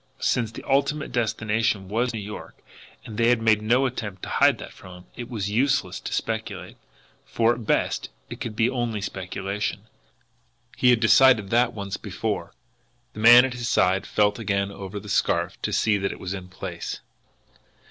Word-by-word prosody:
Since 115 -3 0
the - - -8
ultimate 140 +2 +1
destination 110 -3 0
was 120 +5 0
New 110 - -5
York, 105 +1 -8 0.5
and 110 -1 -7
they 115 0 +4
had 120 -1 +3
made 110 -2 +3
no 120 +5 +2
attempt 105 -7 -5
to - - -5
hide - - +4
that - - -10
from 90 -1 -13
him, - - -27
it 120 -1 -7
was 105 -4 -3
useless 135 -4 +1
to - - -7
speculate 110 0 -4 0.5
for 115 +1 +1
at 115 -3 -8
best - - 0 0.2
it - - -9
could 110 -2 -4
be 115 +1 +2
only 120 -4 -2
speculation. 95 +1 -4 0.9
He 125 - +3
had 120 -2 +4
decided 110 -3 +5
that 120 0 +3
once 100 -3 -5
before! - - -4 0.6
The - - -9
man 120 +3 +8
at 130 - -3
his 120 -1 -4
side 95 +2 +2
felt 105 0 +1
again 100 -2 -1
over 100 0 -7
the 105 - -12
scarf 100 - 0
to - - -2
see 105 -2 +2
that 95 0 -1
it - - -9
was 95 0 -4
in 95 -2 -7
place. 90 0 -6
110 Hz, 180 wpm, -24 LUFS, 100-120 Hz, 0.9 s, man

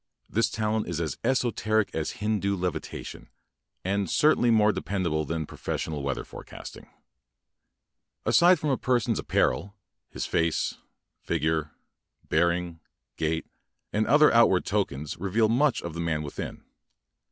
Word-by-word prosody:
This 115 +1 +1
talent 110 0 -1
is 85 -2 -3
aa 80 -5 -1
esoteric 110 -5 +1
as 80 +5 -3
Hindu 105 -2 +1
levitation 90 0 -5 0.5
and 100 -1 0
cer 155 +1 +5
tainly 120 -1 +2
more 105 -1 +5
de - - -4
pendable 85 -6 -1
than 80 -1 -2
pro - - -13
fessional 75 -3 -3
weather 70 -1 -2
forecasting - - -10 1.4
I - - +2
Aside 175 +1 +6
from 150 -1 -1
a 130 - 0
per 125 -1 +2
son's 115 -1 -1
apparel, 100 +1 0 0.3
his - - -4
face, 85 -1 0 0.4
figure, 80 -1 -1 0.6
bear 85 +2 +3
ing, 85 -1 -3 0.4
gait, 80 +1 -1 0.5
and 110 +1 +1
other 150 +4 +6
outward 115 -6 +5
tokens 75 -8 -2
reveal 100 +5 +1
much 135 +4 +2
of 85 - -5
the 85 - -6
man 80 -2 -1
within. 70 - -6
100 Hz, 145 wpm, -27 LUFS, 80-110 Hz, 1.4 s, Aside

